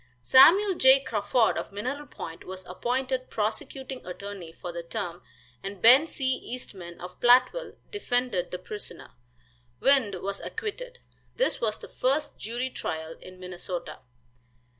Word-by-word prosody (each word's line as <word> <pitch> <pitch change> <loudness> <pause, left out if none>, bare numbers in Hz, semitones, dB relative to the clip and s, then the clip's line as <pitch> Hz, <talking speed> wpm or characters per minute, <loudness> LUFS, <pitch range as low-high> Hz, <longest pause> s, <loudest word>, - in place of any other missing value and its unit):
Samuel 370 - +7
J. 265 -4 +6
Crawford 220 +1 +2
of - - -6
Mineral 255 +9 -4
Point 165 0 -8
was 185 0 -8
appointed 255 +7 -2
prosecuting 250 +5 -3
attorney 185 -1 -7
for 175 +1 -7
the 170 0 -5
term, 175 -1 -5 0.4
and 195 0 -6
Ben 255 - +7
C. 275 -4 -4
Eastman 185 -8 -8
of 180 +1 -9
Plattville 255 - +4 0.2
defended 245 - -1
the 180 - -4
prisoner. 205 +3 -8 0.7
"Wind" 265 -8 +4
was 200 0 -3
acquitted. 485 +3 -5 0.4
This - - 0
was 215 -2 0
the - - -11
first 290 +4 0
jury 240 +4 -3
trial 160 -5 -4
in 185 0 -12
Minnesota. 180 -1 -6
225 Hz, 135 wpm, -27 LUFS, 185-265 Hz, 0.7 s, Samuel